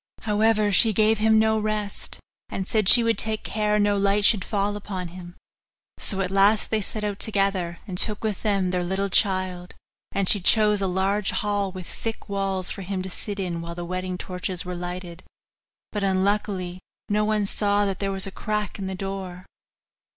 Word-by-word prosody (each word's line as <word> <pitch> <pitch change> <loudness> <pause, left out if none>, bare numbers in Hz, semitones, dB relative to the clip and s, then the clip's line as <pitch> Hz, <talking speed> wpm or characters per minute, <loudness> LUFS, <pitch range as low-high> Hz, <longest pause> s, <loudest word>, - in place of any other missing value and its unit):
However, 215 0 +2
she 220 +3 +5
gave 215 +1 +3
him 220 0 +4
no 220 0 +3
rest, 215 -1 -3 0.3
and 190 -1 -4
said 215 -4 +3
she 240 - +9
would 230 0 +1
take 220 -1 0
care 210 -1 0
no 205 -1 +2
light 200 +1 +2
should 210 -4 +4
fall 205 -1 -1
upon 190 -3 -5
him. 175 0 -10 0.6
So 195 -1 0
at 185 -1 -2
last 200 +2 +3
they 220 -1 +1
set 210 +2 -5
out 205 -1 -2
together, 195 -5 0
and 185 -4 -3
took 210 -1 0
with 215 -3 -2
them 195 -4 +1
their 180 -1 0
little 190 +2 -1
child; 185 -2 0 0.4
and 195 -1 -1
she 205 - +5
chose 210 +1 +4
a 195 - +1
large 190 +2 +1
hall 205 -2 -1
with 185 -1 -8
thick 225 +5 -6
walls 195 -2 -2
for - - -6
him 190 0 -3
to 190 - -6
sit 205 +2 -5
in 175 -3 -3
while 170 0 -6
the 175 0 -5
wedding 185 +1 -3
torches 180 0 -4
were 180 - -4
lighted; 175 0 -5 0.7
but, 210 -1 -3
unluckily, 190 -1 0 0.3
no 210 +1 +1
one 210 -1 +1
saw 205 0 +1
that 195 -1 -2
there 195 -1 -1
was 195 -1 0
a 195 - -6
crack 210 0 -3
in 195 - -3
the 190 - -4
door. 190 -1 -6
195 Hz, 195 wpm, -24 LUFS, 185-210 Hz, 0.7 s, she